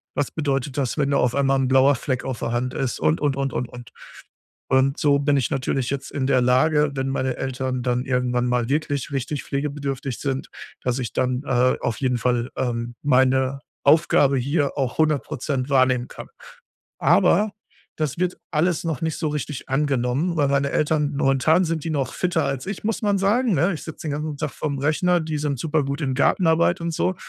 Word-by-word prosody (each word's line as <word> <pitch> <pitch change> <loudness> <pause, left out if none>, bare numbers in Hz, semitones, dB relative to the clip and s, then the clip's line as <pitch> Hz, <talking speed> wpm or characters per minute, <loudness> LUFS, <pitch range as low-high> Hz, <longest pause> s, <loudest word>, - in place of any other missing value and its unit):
Was 145 - 0
bedeutet 140 -2 -2
das, 135 +1 -1
wenn 140 -1 +1
da 140 - +3
auf 125 -1 +2
einmal 135 -1 +2
'n 130 - +1
blauer 135 +1 +5
Fleck 130 0 -3
auf 130 -2 -4
der 115 - -2
Hand 125 +1 -2
ist 130 -3 -2
und, 80 +1 +2
und, 145 -2 +1
und, 135 0 -1
und, 125 - -2
und. 120 -2 -11 0.8
Und 135 +1 +2
so 140 -1 +3
bin 145 0 +2
ich 135 - 0
natürlich 135 -2 -1
jetzt 140 0 -4
in 135 -2 -1
der 130 -2 +3
Lage, 145 +4 +3
wenn 135 0 -2
meine 130 -1 -1
Eltern 130 -1 -3
dann 125 0 0
irgendwann 125 -1 0
mal 125 -1 0
wirklich 145 -1 -1
richtig 135 +2 -3
pflegebedürftig 140 -2 -3
sind, 135 -1 -3 0.3
dass 125 +1 -1
ich 120 - -4
dann, 130 +1 0
äh, 125 -1 +2
auf 115 - -2
jeden 125 -2 +1
Fall, 120 +1 0
ähm, 120 -2 -2
meine 130 0 +2 0.2
Aufgabe 140 -2 +4
hier 140 +3 0
auch 130 0 -2
100% 145 -3 0
wahrnehmen 130 -2 +3
kann. - - -9 0.7
Aber 210 0 +4 0.5
das 155 0 -2
wird 180 0 -1
alles 165 +2 +1
noch 160 -6 -2
nicht 160 -1 -1
so 160 - -2
richtig 145 -2 -5
angenommen, 135 +4 0
weil 145 -2 +3
meine 140 0 +1
Eltern 150 -1 +1
momentan 145 +6 +3
sind 165 -2 -2
die 165 - -2
noch 140 -4 -2
fitter 170 -4 0
als 135 +1 -3
ich, 195 +1 -5
muss 225 0 -1
man 205 -2 +2
sagen, 215 +2 +2
ne? 175 +7 +2
Ich - - -7
sitze 160 - -8
den - - -1
ganzen 150 0 -3
Tag 150 -3 -3
vorm 145 -2 -3
Rechner, 165 +5 +2
die 155 -1 -3
sind 145 -3 -2
super 155 -1 0
gut 140 +3 -3
in 135 -4 -1
Gartenarbeit 170 +4 +2
und 170 0 -2
so. 185 - 0
140 Hz, 200 wpm, -23 LUFS, 130-150 Hz, 0.8 s, blauer